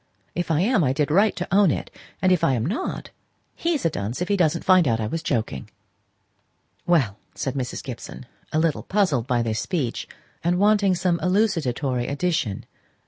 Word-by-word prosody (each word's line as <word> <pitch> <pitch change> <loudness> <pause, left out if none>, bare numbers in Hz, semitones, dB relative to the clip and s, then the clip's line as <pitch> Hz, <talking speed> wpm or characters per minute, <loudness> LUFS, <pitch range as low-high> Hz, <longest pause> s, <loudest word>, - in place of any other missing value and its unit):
If 175 -1 -3
I 160 0 +2
am, 210 -2 +3
I 130 -2 +2
did 150 +1 0
right 200 +6 +4
to 180 - -4
own 200 -3 +6
it; - - -3 0.3
if 185 -3 +3
I 145 -6 +3
am 115 -1 -1
not, 230 - -3 0.4
he's 330 - -1
a - - +4
dunce 110 -1 -4
if 180 - -2
he 205 - +3
doesn't 170 -3 +1
find 185 -4 +5
out 115 -2 +1
I 110 - -1
was 160 +10 -3
joking." 110 - -2 1.2
"Well," 130 - +2 0.2
said 135 - -2
Mrs. 130 -3 -4
Gibson, 125 -1 -8 0.3
a - - 0
little 160 -1 +1
puzzled 180 - +1
by 120 -3 +1
this 110 -2 -1
speech, 150 -11 -2 0.4
and 175 +1 +2
wanting 205 -1 +3
some 175 -1 0
elucidatory 150 - 0
addition. 140 - -1
165 Hz, 180 wpm, -24 LUFS, 125-185 Hz, 1.2 s, own